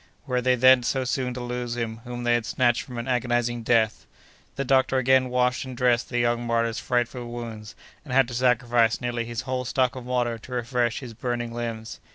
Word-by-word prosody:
Were 125 Hz, -2 st, 0 dB
they 130 Hz, +1 st, +3 dB
then 130 Hz, +1 st, +6 dB
so 130 Hz, +2 st, 0 dB
soon 125 Hz, 0 st, -2 dB
to 125 Hz, -, -5 dB
lose 120 Hz, -1 st, -4 dB
him 115 Hz, -2 st, -3 dB
whom 120 Hz, 0 st, -5 dB
they 120 Hz, 0 st, +3 dB
had 120 Hz, -2 st, 0 dB
snatched 120 Hz, -2 st, +2 dB
from 125 Hz, -2 st, -9 dB
an 120 Hz, -, -4 dB
agonizing 120 Hz, -1 st, 0 dB
death? 110 Hz, -1 st, +1 dB, 0.5 s
The 140 Hz, -, -2 dB
doctor 130 Hz, 0 st, +3 dB
again 130 Hz, 0 st, +3 dB
washed 125 Hz, 0 st, +1 dB
and 130 Hz, -2 st, -8 dB
dressed 125 Hz, -1 st, +2 dB
the 120 Hz, -, -2 dB
young 120 Hz, 0 st, +1 dB
martyr's 115 Hz, -1 st, 0 dB
frightful 120 Hz, 0 st, -1 dB
wounds, 115 Hz, -3 st, -7 dB, 0.3 s
and 145 Hz, -, -10 dB
had 135 Hz, -1 st, +4 dB
to -, -, -7 dB
sacrifice 120 Hz, -2 st, +2 dB
nearly 120 Hz, -1 st, -2 dB
his 120 Hz, +1 st, -4 dB
whole 130 Hz, 0 st, -3 dB
stock 125 Hz, 0 st, 0 dB
of 130 Hz, -, -7 dB
water 120 Hz, -2 st, 0 dB
to 125 Hz, -, -10 dB
refresh 120 Hz, -1 st, -1 dB
his 120 Hz, -3 st, -8 dB
burning 120 Hz, 0 st, -3 dB
limbs. 115 Hz, -2 st, -5 dB
120 Hz, 210 wpm, -25 LUFS, 120-125 Hz, 0.5 s, then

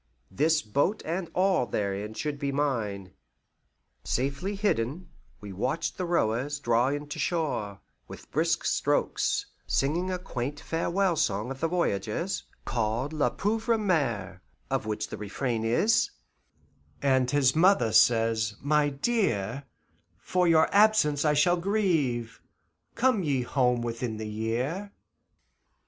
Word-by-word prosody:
This 155 Hz, +9 st, +2 dB
boat 140 Hz, -, 0 dB
and 170 Hz, +1 st, -3 dB
all 185 Hz, -8 st, +2 dB
therein 100 Hz, +1 st, -3 dB
should 150 Hz, +1 st, -3 dB
be 140 Hz, 0 st, -1 dB
mine. 110 Hz, -10 st, -2 dB, 0.9 s
Safely 140 Hz, +10 st, -2 dB
hidden, 175 Hz, -, -1 dB, 0.3 s
we 100 Hz, -2 st, -8 dB
watched 130 Hz, -, -2 dB
the 185 Hz, -, -3 dB
rowers 140 Hz, -2 st, 0 dB
draw 120 Hz, -2 st, +2 dB
in 145 Hz, +2 st, -2 dB
to -, -, -5 dB
shore, 140 Hz, -, -2 dB, 0.3 s
with -, -, -12 dB
brisk -, -, 0 dB
strokes, -, -, 0 dB, 0.2 s
singing 165 Hz, +7 st, 0 dB
a 185 Hz, -, -1 dB
quaint 145 Hz, -4 st, -5 dB
farewell 170 Hz, +3 st, 0 dB
song 105 Hz, -2 st, 0 dB
of 135 Hz, -, -6 dB
the 165 Hz, -, +1 dB
voyageurs, 170 Hz, -, -1 dB, 0.2 s
called 120 Hz, +5 st, -1 dB
La 150 Hz, -2 st, +2 dB
Pauvre 225 Hz, +3 st, 0 dB
Mere, 140 Hz, -, -1 dB, 0.3 s
of -, -, -1 dB
which 105 Hz, 0 st, -2 dB
the -, -, -6 dB
refrain 110 Hz, +3 st, -3 dB
is: 125 Hz, -, +2 dB, 0.9 s
"And 130 Hz, -2 st, +3 dB
his 135 Hz, -1 st, +3 dB
mother 165 Hz, -, +4 dB
says, 115 Hz, -2 st, +3 dB
'My 150 Hz, +1 st, +2 dB
dear, 140 Hz, -, -1 dB, 0.5 s
For 180 Hz, -1 st, 0 dB
your 160 Hz, -1 st, +5 dB
absence 200 Hz, -9 st, +4 dB
I 150 Hz, -, +4 dB
shall 175 Hz, +5 st, +4 dB
grieve; 160 Hz, -, 0 dB, 0.5 s
Come 245 Hz, -3 st, +2 dB
you 140 Hz, -7 st, 0 dB
home 125 Hz, -2 st, +1 dB
within 115 Hz, -1 st, -3 dB
the 110 Hz, 0 st, -5 dB
year. 125 Hz, -, -3 dB
140 Hz, 130 wpm, -28 LUFS, 115-175 Hz, 0.9 s, your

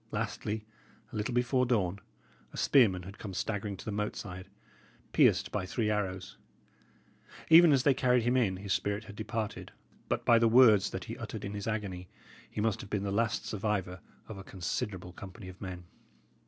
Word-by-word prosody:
Lastly, 105 Hz, +1 st, -3 dB, 0.5 s
a -, -, -6 dB
little 110 Hz, +3 st, -2 dB
before 125 Hz, +1 st, +2 dB
dawn, 100 Hz, -6 st, +1 dB, 0.5 s
a -, -, -10 dB
spearman 100 Hz, -10 st, +4 dB
had 95 Hz, +3 st, -10 dB
come 95 Hz, -4 st, -6 dB
staggering 105 Hz, 0 st, -3 dB
to -, -, -11 dB
the 110 Hz, -, -3 dB
moat 105 Hz, +1 st, -2 dB
side, 95 Hz, 0 st, -8 dB, 0.6 s
pierced -, -, +4 dB
by 105 Hz, -, -1 dB
three 110 Hz, +1 st, 0 dB
arrows; 95 Hz, -3 st, -3 dB, 1.1 s
even 165 Hz, 0 st, +9 dB
as 135 Hz, -3 st, +3 dB
they 140 Hz, -, +5 dB
carried 125 Hz, -2 st, +2 dB
him 120 Hz, +2 st, +2 dB
in, 105 Hz, -8 st, +2 dB
his 95 Hz, 0 st, -2 dB
spirit 100 Hz, +1 st, -1 dB
had 105 Hz, -2 st, -11 dB
departed; 110 Hz, 0 st, -4 dB, 0.4 s
but -, -, -1 dB
by 115 Hz, -1 st, +6 dB
the 115 Hz, -, +4 dB
words 110 Hz, -4 st, +6 dB
that -, -, -5 dB
he -, -, -7 dB
uttered -, -, -6 dB
in 100 Hz, -, -5 dB
his 100 Hz, 0 st, -5 dB
agony, 100 Hz, -5 st, -4 dB, 0.4 s
he -, -, -6 dB
must 110 Hz, -1 st, 0 dB
have 100 Hz, -, -10 dB
been 105 Hz, -2 st, -1 dB
the 100 Hz, -, -2 dB
last 110 Hz, +2 st, 0 dB
survivor 100 Hz, -3 st, -2 dB, 0.3 s
of 110 Hz, -3 st, -8 dB
a -, -, -8 dB
considerable 90 Hz, 0 st, -4 dB
company 95 Hz, 0 st, -10 dB
of 95 Hz, -, -13 dB
men. 90 Hz, -3 st, -6 dB
105 Hz, 185 wpm, -31 LUFS, 95-115 Hz, 1.1 s, even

